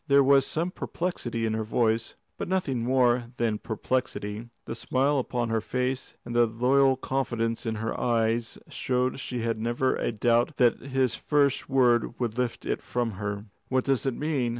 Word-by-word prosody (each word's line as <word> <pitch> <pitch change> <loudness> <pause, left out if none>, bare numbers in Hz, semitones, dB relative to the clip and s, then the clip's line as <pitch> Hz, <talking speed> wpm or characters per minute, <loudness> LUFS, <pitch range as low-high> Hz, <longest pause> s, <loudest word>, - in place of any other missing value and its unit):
There 140 0 +6
was 135 0 +5
some 170 +3 -1
perplexity 120 -13 -3
in 110 - 0
her 110 0 -1
voice, 115 0 0 0.2
but - - -4
nothing 175 -9 0
more 125 -1 +3
than 110 -3 0
perplexity. 110 -1 -3 0.2
The - - -4
smile 135 +2 +1
upon 120 -2 -2
her 110 -1 +1
face 125 +3 -2
and 120 0 -5
the 120 0 +5
loyal 130 +4 +3
confidence 120 -4 -1
in 110 - -1
her 115 +1 -2
eyes 115 -1 0
showed 125 +1 -1
she 125 -2 -3
had 115 -1 -1
never 120 +3 +1
a - - -1
doubt 120 +5 +2
that 120 -2 +3
his 130 -3 0
first 145 -3 +1
word 120 -3 +3
would 120 -3 -1
lift 125 -1 -2
it - - -1
from 120 -2 -2
her. 100 0 -3 0.2
"What 130 0 +2
does 135 -1 +1
it 130 - 0
mean?" 145 -5 0
120 Hz, 175 wpm, -27 LUFS, 115-130 Hz, 0.2 s, There